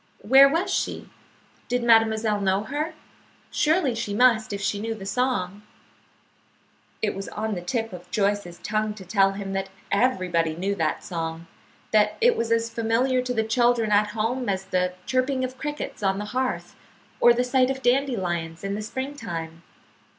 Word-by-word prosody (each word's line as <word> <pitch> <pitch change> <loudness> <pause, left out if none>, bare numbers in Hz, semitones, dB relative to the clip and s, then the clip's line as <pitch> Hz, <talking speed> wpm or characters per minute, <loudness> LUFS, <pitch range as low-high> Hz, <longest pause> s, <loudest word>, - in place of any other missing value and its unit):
Where 270 +5 +7
was 330 +6 0
she? - - -2 0.6
Did 245 0 -1
mademoiselle 220 -2 +3
know 195 +1 +1
her? 300 +6 -3 0.6
Surely 310 -4 +2
she 220 -3 -3
must 230 -2 +4
if 200 - -3
she 200 +1 -1
knew 225 +1 -3
the 195 -3 -9
song. 205 -3 -1 1.4
It 210 - +1
was 195 0 -6
on 220 +1 -3
the 180 - -4
tip 225 +3 -3
of 180 0 -10
Joyce's 200 -3 -1
tongue 215 0 -1
to 195 -3 -11
tell 195 0 +3
him 195 -1 -5
that 195 0 -2 0.2
everybody 185 -8 +1
knew 190 +4 -1
that 160 -5 -1
song; 165 -1 -4 0.5
that 210 -1 +3
it 480 +1 +4
was 230 0 -2
as 230 0 +2
familiar 230 +3 +1
to 250 0 -3
the 220 - +2
children 235 -1 +2
at 210 +1 +4
home 225 +3 -2
as 190 -1 -1
the 180 -1 0
chirping 260 0 0
of 255 0 -5
crickets 295 -5 -5
on 195 -1 +1
the 205 - -4
hearth 255 0 -2 0.4
or 240 - +7
the 240 +1 +2
sight 255 0 +2
of 265 0 -3
dandelions 185 -11 0
in 195 0 -2
the 210 - -3
spring 260 +6 -5
time. 165 - -6
220 Hz, 170 wpm, -25 LUFS, 195-250 Hz, 1.4 s, Where